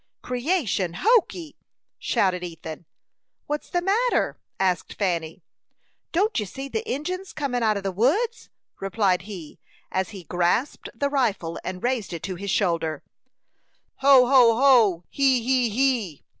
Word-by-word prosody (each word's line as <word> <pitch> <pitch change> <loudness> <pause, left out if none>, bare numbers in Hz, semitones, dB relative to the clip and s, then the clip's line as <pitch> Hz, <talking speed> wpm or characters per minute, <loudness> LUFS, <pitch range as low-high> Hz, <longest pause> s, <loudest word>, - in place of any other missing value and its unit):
"Creation 245 - -1
hokee!" 375 -8 +2 0.4
shouted 180 -2 0
Ethan. 165 -1 -8 0.6
"What's 295 0 -4
the 350 -1 -1
matter?" 450 +6 +1 0.2
asked 185 -2 0
Fanny. 170 -5 -2 0.7
"Don't 405 - +1
you 210 - -3
see 270 +8 -7
the 445 +10 -2
Injins 365 +7 -4
comin' 275 -5 -2
out 215 -2 +2
of 200 - -5
the 195 - -1
woods?" 380 - 0 0.3
replied 195 -2 +1
he, 175 -7 -9 0.3
as 190 0 -1
he 195 -4 -9
grasped 180 - -1
the 280 0 -1
rifle, 210 - -1
and 185 0 -6
raised 245 -7 -1
it 165 - -6
to 190 - -3
his 200 +3 -6
shoulder. 165 -6 0 0.9
"Ho, 270 -2 +6
ho, 245 -3 +6
ho! 230 -9 +4
He, 265 -4 +2
he, 250 -1 +2
he!" 230 - 0
230 Hz, 140 wpm, -24 LUFS, 185-280 Hz, 0.9 s, Ho